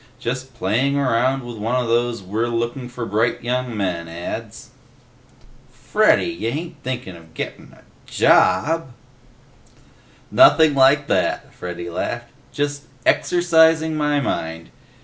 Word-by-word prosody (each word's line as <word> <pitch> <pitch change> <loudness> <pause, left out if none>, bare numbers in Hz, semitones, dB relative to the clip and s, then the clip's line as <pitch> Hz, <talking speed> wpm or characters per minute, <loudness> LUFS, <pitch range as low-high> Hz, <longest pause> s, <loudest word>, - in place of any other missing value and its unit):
Just 130 +1 -5
playing 120 +7 0
around 130 0 +1
with 120 -1 -8
one 115 +4 -2
of 125 -2 0
those 120 -1 0
'We're 110 +5 -2
looking 120 +2 -3
for 125 -1 -6
bright 115 +3 0
young 125 -1 -2
men' 90 -4 -2
ads." 85 +1 -7 1.0
"Freddy! 215 0 +2
Y'ain't 165 +1 -4
thinkin' 125 -8 -5
a - - -12 0.2
gettin' - - -6
a - - -20 0.2
JOB?" 130 - +2 1.4
"Nothing 160 -2 +6
like 140 +2 +4
that," - - -1
Freddy 85 -1 -7
laughed. 120 +7 -4 0.2
"Just, 145 0 -3 0.2
exercising 160 -2 +3
my 150 -1 +1
mind. 80 -10 -4
125 Hz, 120 wpm, -21 LUFS, 110-145 Hz, 1.4 s, Nothing